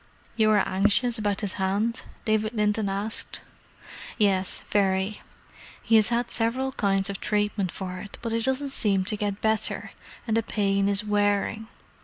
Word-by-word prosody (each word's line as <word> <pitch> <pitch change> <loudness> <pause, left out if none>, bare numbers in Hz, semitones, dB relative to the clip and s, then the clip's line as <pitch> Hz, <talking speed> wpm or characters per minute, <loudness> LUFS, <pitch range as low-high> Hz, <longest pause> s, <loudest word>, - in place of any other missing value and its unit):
"You 220 -2 +3
are 210 -2 +3
anxious 210 +5 +1
about 205 -1 -1
his 205 -3 -1
hand?" 205 +5 0 0.2
David 215 0 0
Linton 210 -1 +1
asked. 200 +3 -2 0.8
"Yes, 195 -3 +2
very. 195 0 0 0.6
He 225 - +3
has 215 - +4
had 240 0 -1
several 250 +4 0
kinds 195 -4 0
of 195 - -6
treatment 205 -3 0
for 185 -1 -6
it, 200 - -9
but 230 -1 -2
it 230 0 0
doesn't 265 +2 -1
seem 200 -7 +4
to 210 - -1
get 205 -1 -3
better; 220 0 -1 0.4
and 220 - +1
the 230 - +3
pain 200 -2 0
is 200 +1 0
wearing. 205 +1 0
210 Hz, 160 wpm, -26 LUFS, 195-225 Hz, 0.8 s, has